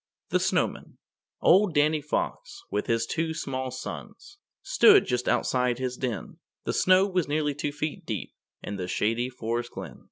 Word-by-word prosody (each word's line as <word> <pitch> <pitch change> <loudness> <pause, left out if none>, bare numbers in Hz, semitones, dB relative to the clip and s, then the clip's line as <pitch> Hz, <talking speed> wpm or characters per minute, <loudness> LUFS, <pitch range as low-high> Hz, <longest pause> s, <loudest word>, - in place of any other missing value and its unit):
THE - - +2
SNOWMAN - - -1 0.4
Old 190 -2 +5
Danny 150 +1 +3
Fox, 390 - -3
with - - -1
his 115 -1 +1
two 160 +5 -2
small 130 -4 -3
sons, 395 - -8 0.2
Stood 435 -5 +6
just 125 0 -1
outside 125 -1 +1
his 130 -1 -3
den; 125 -5 -4 0.2
The - - -2
snow 185 +1 +5
was 185 -4 0
nearly 150 0 0
two 145 +1 -3
feet 150 +1 -4
deep - - -5 0.3
In 100 - -5
the 90 -1 -4
Shady 115 +6 0
Forest 120 -1 -3
Glen. - - -8
145 Hz, 160 wpm, -27 LUFS, 125-175 Hz, 0.4 s, Stood